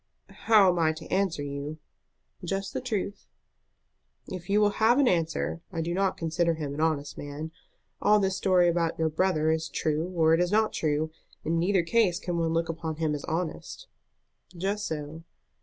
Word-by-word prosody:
"How 215 -4 +7
am 175 - -1
I 160 -1 +3
to 160 +1 -10
answer 190 -6 +1
you?" 140 +2 -5 0.7
"Just 195 +2 -3
the - - -2
truth." 210 -5 -3 1.0
"If 180 -1 -7
you 205 +1 +4
will 205 -1 +2
have 230 +3 +5
an 285 -2 +4
answer, 165 -2 0
I 165 -3 -2
do 170 +2 -2
not 190 +1 0
consider 165 0 0
him 150 -3 -4
an 150 - -3
honest 150 -3 -1
man. 145 +2 -6 0.5
All 210 +1 +5
this 190 -1 0
story 185 -2 +3
about 170 -1 +1
your 160 -1 +1
brother 155 -1 +1
is 160 0 -1
true 155 +3 -1
or 160 -1 +4
is 175 +2 +2
not 215 +1 +2
true. 155 0 0 0.3
In 165 +1 +1
neither 185 +1 +2
case 185 -1 +2
can 175 -3 -2
one 165 -1 +1
look 165 0 0
upon 165 -1 -4
him 155 -1 -1
as 145 - -4
honest." 170 - -4 0.7
"Just 200 +4 -1
so." 155 +1 -5
165 Hz, 180 wpm, -28 LUFS, 160-190 Hz, 1.0 s, How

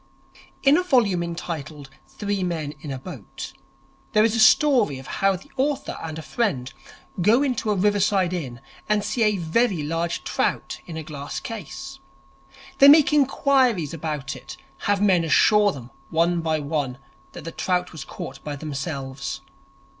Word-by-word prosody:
In 280 +3 +6
a - - +3
volume 230 - +3
entitled 160 -5 -6 0.2
'Three 205 -2 -3
Men 160 -5 -3
in 150 - -7
a 135 - -3
Boat' 135 - -9 0.6
there 215 - +5
is 225 0 +2
a - - 0
story 225 - +5
of 130 - -10 0.2
how 195 0 +4
the 190 +10 -12
author 280 +2 -1
and 160 -1 -5
a 160 - -6
friend 150 - -1 0.5
go 225 +9 +4
into 250 -5 -1
a 210 - +2
riverside 195 -2 +2
inn 130 -9 -5 0.3
and 210 -1 +2
see 215 +3 -2
a 210 -2 +3
very 180 +1 +1
large 165 +3 -2
trout - - -1
in 165 -2 -6
a 160 - -5
glass 145 -2 -6
case. 135 - -7 0.8
They 275 - +9
make 295 +1 +7
inquiries 265 - +2
about 150 -4 -4
it, - - -10 0.3
have 205 -1 +2
men 185 -4 +4
assure 205 +6 +4
them, 125 -6 -10 0.2
one 170 +1 +2
by 160 -1 0
one, 140 -4 -2 0.4
that - - -9
the 165 - -6
trout 180 0 -1
was 160 -4 -7
caught 135 +1 -8
by 145 -1 -4
themselves. 135 -2 -5
175 Hz, 160 wpm, -24 LUFS, 150-215 Hz, 0.8 s, They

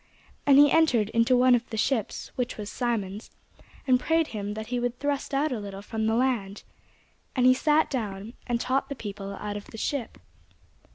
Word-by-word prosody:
And 275 -1 +7
he 290 0 +7
entered 255 -10 +3
into 230 +3 +3
one 255 0 +5
of 240 -1 +1
the 220 - -5
ships, 225 -1 -1
which 250 0 -2
was 210 -1 -6
Simon's, 215 -4 -3 0.6
and 255 -2 +4
prayed 325 +3 +1
him 205 -1 -4
that 220 0 -5
he 245 - +1
would 245 0 -2
thrust 285 0 -2
out 285 +2 +1
a 245 - -2
little 200 -1 -7
from 220 0 -2
the 220 - +2
land. 230 -6 0 0.7
And 250 -2 +2
he 255 - +8
sat 300 +4 +3
down, 215 -4 -4
and 240 -1 0
taught 270 +3 0
the 280 - -4
people 200 -3 -6
out 205 +1 -5
of 205 - -9
the - - -11
ship. 255 +1 -3
240 Hz, 195 wpm, -27 LUFS, 210-265 Hz, 0.7 s, he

